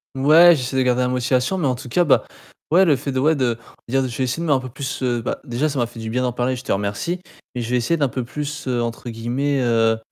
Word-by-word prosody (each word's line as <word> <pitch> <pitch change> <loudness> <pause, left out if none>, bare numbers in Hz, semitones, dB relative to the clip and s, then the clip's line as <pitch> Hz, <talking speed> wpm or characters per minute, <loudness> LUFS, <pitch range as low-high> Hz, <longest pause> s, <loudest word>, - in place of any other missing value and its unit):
Ouais, 160 +5 +7
j'essaie 130 0 -3
de - - +3
garder 125 0 +2
la 125 - +1
motivation, 125 +7 0
mais 155 -6 0
en 125 - +1
tout 125 0 -10
cas, 175 +8 +3
bah, 150 - +3 0.5
ouais, 185 +3 +6
le 150 -4 +4
fait 140 +2 -4
de 130 - -1
ouais, 155 +3 +3
de 120 -4 0 0.3
dire: 135 +3 +1
«Je 120 - -7
vais 130 - 0
essayer 130 +6 -2
de - - -2
mettre 145 - +4
un - - -3
peu 130 - -7
plus» 135 +1 -5
heu, 120 -2 0
bah, - - -3
déjà 135 +4 -1
ça 140 - -4
m'a 120 - +2
fait 115 0 -11
du 110 0 -5
bien 125 +3 -1
d'en 125 - 0
parler, 125 +2 -1
je 125 - -8
te - - -3
remercie 105 - -2 0.3
et 125 - -3
je 115 - -4
vais 125 - +2
essayer 165 +8 0
d'un 140 -2 +2
peu 130 -1 -3
plus, 150 +3 -6
heu, 120 -2 0
entre 115 +1 -4
guillemets, 125 +5 -1
heu, 115 -2 +2
130 Hz, 295 wpm, -21 LUFS, 120-145 Hz, 0.5 s, Ouais